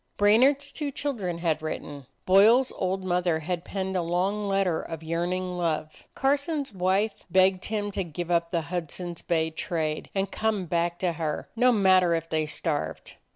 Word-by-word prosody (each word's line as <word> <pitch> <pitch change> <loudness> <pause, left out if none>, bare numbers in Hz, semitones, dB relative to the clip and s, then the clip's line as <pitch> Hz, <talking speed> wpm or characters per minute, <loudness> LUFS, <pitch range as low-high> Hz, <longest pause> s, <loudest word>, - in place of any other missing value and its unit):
Brainard's 265 +8 +4
two 295 -2 -3
children 230 -12 -3
had 165 -2 0
written; 145 -3 -6 0.2
Boyle's 220 +7 +6
old 190 0 -2
mother 180 -2 +1
had 170 +2 -3
penned 190 0 -3
a 180 - +2
long 190 +5 -1
letter 195 -4 +1
of 165 -1 -7
yearning 180 +2 -2
love; 155 -2 -2
Carson's 280 -1 0
wife 190 +3 +1 0.2
begged 185 +1 +3
him 205 -1 -2
to 195 -1 -2
give 175 +1 -5
up 170 -1 +2
the 170 -1 0
Hudson's 175 +1 -5
Bay 160 -1 0
trade, 160 -1 -3
and 195 0 -1
come 215 -4 -1
back 170 +1 0
to 180 -1 0
her, 160 -2 -3
no 250 +2 +4
matter 185 -5 +4
if 165 0 -3
they 155 -1 -1
starved. 150 - -3
180 Hz, 165 wpm, -27 LUFS, 165-205 Hz, 0.2 s, Boyle's